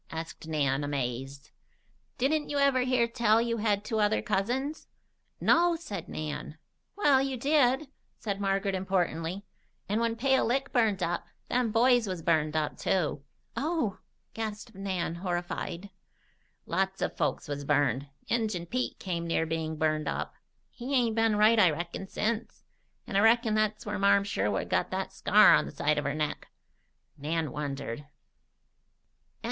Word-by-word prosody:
asked 160 0 -7
Nan, 145 -3 0
amazed. 135 +1 -4 0.7
"Didn't 295 +4 +1
you 290 - -1
ever 280 -2 +4
hear 250 -2 +2
tell 230 -2 +3
you 230 0 0
had 210 -2 0
two 220 -1 -1
other 210 +1 +2
cousins?" 245 +8 -1 0.5
"No," 345 0 +4
said 205 - -7
Nan. 150 0 -5 0.4
"Well, 290 -9 +4
you 270 -1 -2
did," 275 +1 +2 0.3
said 200 -2 -4
Margaret 195 0 0
importantly. 185 -1 -1 0.4
"And 210 +3 0
when 230 -1 0
Pale 265 +3 +2
Lick 270 +3 -1
burned 215 -6 +2
up, 170 0 -2 0.2
them 245 -2 +1
boys 240 0 +4
was 180 -4 -4
burned 155 -2 +2
up, 155 -1 -1
too." 165 -7 0 0.3
"Oh!" 300 - -1 0.3
gasped 220 +1 -5
Nan, 190 -4 -2
horrified. 175 +1 -4 0.7
"Lots 190 0 -1
of - - -2
folks 150 -4 -1
was 145 -1 -4
burned. 140 -2 +1 0.2
Injun 215 -6 -1
Pete 250 +8 -2
come 170 -3 -3
near 165 -1 +1
being 160 0 -2
burned 155 0 0
up. - - -3 0.4
He 255 +3 -3
ain't 235 -3 +2
been 225 -1 +3
right, 215 +2 +5
I 185 -4 +7
reckon, 170 +4 -4
since. 225 +3 -3 0.4
And 195 - -2
I - - +5
reckon 225 +1 +4
that's 215 0 0
where 210 0 -3
Marm 200 0 +4
Sherwood 105 - -1
got - - 0
that - - -3
scar - - +6
on - - +3
the - - -7
side 150 +1 +1
of 145 - -4
her 145 +1 -1
neck." 150 -1 -3 0.7
Nan 155 +2 -1
wondered. 140 -5 -4
Chapter 145 - -13
XIV. 145 - -45
200 Hz, 155 wpm, -29 LUFS, 160-235 Hz, 0.7 s, I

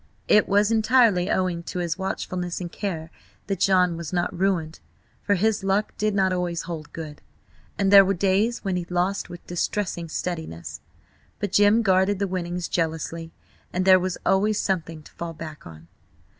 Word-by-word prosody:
It 210 - +4
was 205 +2 +3
entirely 220 -5 +3
owing 180 -2 0
to - - -5
his 175 -2 -1
watchfulness 185 -2 -3
and 175 -2 -6
care 165 -6 -4 0.3
that 195 -3 -3
John 180 -3 +3
was 165 -2 -6
not 180 +1 -1
ruined, 175 -4 -1 0.4
for 205 - +1
his 215 +2 +1
luck 195 +2 0
did 215 -1 0
not 190 -2 +2
always 175 -2 -2
hold 165 -3 -7
good, 155 -2 -8 0.6
and 195 -1 +1
there 200 -1 +11
were 195 +1 0
days 200 +6 +1
when 190 -3 -1
he 175 - -3
lost 180 +3 -1
with 175 - -10
distressing 175 -1 -2
steadiness. 85 - -5 0.6
But 205 -3 -3
Jim 205 +3 +4
guarded 190 0 +3
the 200 - 0
winnings 180 -1 -3
jealously, 165 0 -3 0.4
and 185 +1 -1
there 185 -1 +7
was 185 0 -2
always 205 +2 +2
something 165 -4 -2
to - - -16
fall 170 -1 -6
back 155 - -9
on. 80 0 -13
185 Hz, 170 wpm, -24 LUFS, 170-200 Hz, 0.6 s, there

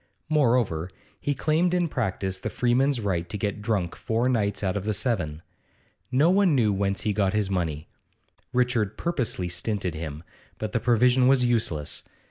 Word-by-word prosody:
Moreover, 120 - +2 0.3
he 145 - -1
claimed 165 +6 +1
in 175 -1 +2
practice 95 - -2
the - - -3
freeman's 130 +2 +2
right 90 -5 -2
to 110 - -3
get 105 0 -3
drunk 105 -6 -1
four 115 +2 0
nights 105 -5 0
out 95 -2 0
of 100 - -2
the 105 0 0
seven. 90 - -2 0.7
No 145 +7 +4
one 190 -5 +4
knew 110 -5 +3
whence 100 0 -1
he 105 - 0
got 100 -2 +1
his 105 -2 0
money; 80 -5 -2 0.6
Richard 120 -5 +1
purposely 125 - -1
stinted 90 +1 -2
him, 80 -1 -6 0.3
but 110 -1 -4
the 115 - 0
provision 125 +2 +4
was 130 -2 +4
useless. 95 -11 0
110 Hz, 165 wpm, -26 LUFS, 95-125 Hz, 0.7 s, No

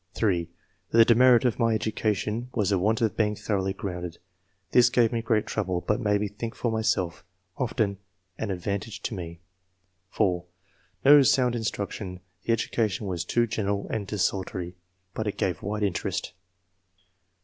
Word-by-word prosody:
(3) 90 -6 +1 0.4
''The 115 0 +7
demerit 125 +1 +6
of 125 -1 +1
my 115 -1 +3
education 110 +2 -1
was 105 -3 +1
the 95 - +2
want 110 +5 +1
of 110 -2 +1
being 105 -1 +1
thoroughly 95 -2 -1
grounded; 90 -3 -5 0.5
this 120 -1 +6
gave 120 -2 +3
me 115 -1 -1
great 110 -2 +1
trouble, 95 -4 -2
but 105 - +1
made 105 -1 +2
me 105 - 0
think 115 +3 -6
for 120 - -1
myself; 110 -6 0 0.3
often 110 -6 -1 0.4
an 110 - -4
advantage 100 +3 -4
to - - -2
me." 85 -3 -7 0.7
(4) 90 -5 +1 0.6
No 145 +1 +9
sound 125 -2 +3
instruction; 100 -4 -4 0.2
the 115 - -1
education 110 -2 0
was 90 -3 -2
too 120 +6 +2
general 100 -3 -2
and 105 -3 -2
desultory, 95 -3 -2 0.4
but 110 - -3
it 105 - -3
gave 90 -5 -1
wide 105 +1 -2
interest. 95 -4 -2
105 Hz, 155 wpm, -27 LUFS, 95-115 Hz, 0.7 s, No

